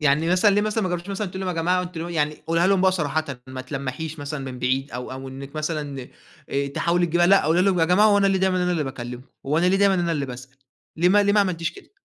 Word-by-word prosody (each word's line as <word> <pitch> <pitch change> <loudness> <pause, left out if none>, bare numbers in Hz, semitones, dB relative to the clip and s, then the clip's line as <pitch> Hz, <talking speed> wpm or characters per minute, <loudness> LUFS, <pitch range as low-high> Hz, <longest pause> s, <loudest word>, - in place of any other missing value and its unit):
يعني 150 +2 +2
مثلًا 185 +3 +4
ليه 205 - +3
مثلًا 215 +1 -1
ما 185 - 0
جرَّبتِيش 175 +1 -4
مثلًا 200 +1 -3
تقولي 190 +1 -6
لهُم: 180 -2 -3
"يا 165 - 0
جماعة 180 +2 +2
أنتُم 175 -2 -7
ل" - - -7
يعني 150 -2 -1
قوليها 165 +2 +2
لهُم 195 -1 +3
بقى 190 0 +4
صراحةً، 160 -3 -1 0.2
ما 130 0 -7
تلمِّحيش 140 +4 -5
مثلًا 145 -1 -5
من 125 - -9
بعيد، 130 +3 -1
أو 125 +1 -6
أو 130 0 -7
إنَّك 135 +3 -9
مثلًا 150 -4 -4 0.4
آآ 140 0 -1
تحاولي 170 +5 +1
تجيبيها، 175 +1 +2
لأ 195 +2 +5
قولي 165 +4 +3
لهُم: 185 -3 +2
"يا - - +5
جماعة 180 +6 +4
هو 205 -1 +4
أنا 200 - +3
ليه 195 -1 +2
دايمًا 185 -1 +1
اللي 180 0 +1
أنا 165 -3 0
باكلمكم؟ 125 -2 -7 0.2
هو 150 +3 +1
أنا 175 - +2
ليه 190 - +3
دايمًا 200 0 +4
اللي 175 -2 0
أنا 170 - 0
اللي 145 -3 -2
باسأَل؟" 130 +1 -10 0.4
ليه 170 +3 +3
ما 205 +2 +5
ليه 200 0 +2
ما 210 - +4
عملتِيش 170 -4 -1
كده؟ 400 - -16
165 Hz, 280 wpm, -23 LUFS, 140-185 Hz, 0.4 s, لأ